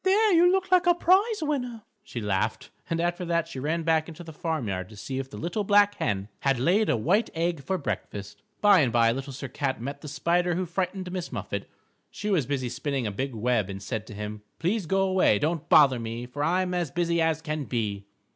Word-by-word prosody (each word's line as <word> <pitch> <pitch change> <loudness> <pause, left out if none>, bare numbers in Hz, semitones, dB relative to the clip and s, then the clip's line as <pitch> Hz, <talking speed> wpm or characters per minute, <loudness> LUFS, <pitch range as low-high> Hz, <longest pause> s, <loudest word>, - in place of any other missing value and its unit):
"There, 405 +2 +4
you 350 +1 +6
look 380 0 0
like 365 0 +5
a 350 - +6
prize 385 +3 +3
winner," 250 -7 -2 0.2
she 125 - -6
laughed, 105 +1 -1 0.2
and 165 - 0
after 175 +1 -1
that 170 -1 0
she 140 - -7
ran 160 +5 -1
back 160 -1 +2
into 170 +1 -9
the 160 -1 -10
farm 155 -5 -2
yard 95 -2 -3
to 110 - -12
see 130 +6 -5
if 135 -1 -5
the - - -9
Little 175 +6 -2
Black 205 0 +5
Hen 100 -3 -1
had 135 -2 +1
laid 190 - +3
a - - +3
white 195 - +2
egg 165 -3 -1
for 190 +4 -1
breakfast. 105 - -5 0.2
By 205 -2 +7
and 135 -6 +3
by 115 0 +4
Little 135 +3 -4
Sir 135 +1 -6
Cat 130 0 -2
met 135 +5 -6
the 150 - -8
Spider 170 +5 +1
who 185 +1 -1
frightened 185 +1 -3
Miss 180 -2 -4
Muffet. - - -4 0.4
She 210 0 -4
was 160 -10 +2
busy 135 -3 -1
spinning 130 +1 -2
a 105 - -1
big 130 +5 -3
web 110 -3 +1
and 95 0 -5
said 110 +1 -5
to 105 - -9
him, 105 0 -6 0.2
"_Please 185 +2 0
go 195 +1 +2
'way, 185 - +4
don't 160 +5 -2
bother 135 -5 +6
me, 115 +1 -5
For 145 +4 -4
I'm 180 +3 +1
as 175 -4 -1
busy 170 +2 0
as 160 -1 +2
can 150 -2 -3
be. 105 -5 -3
160 Hz, 230 wpm, -27 LUFS, 125-185 Hz, 0.4 s, By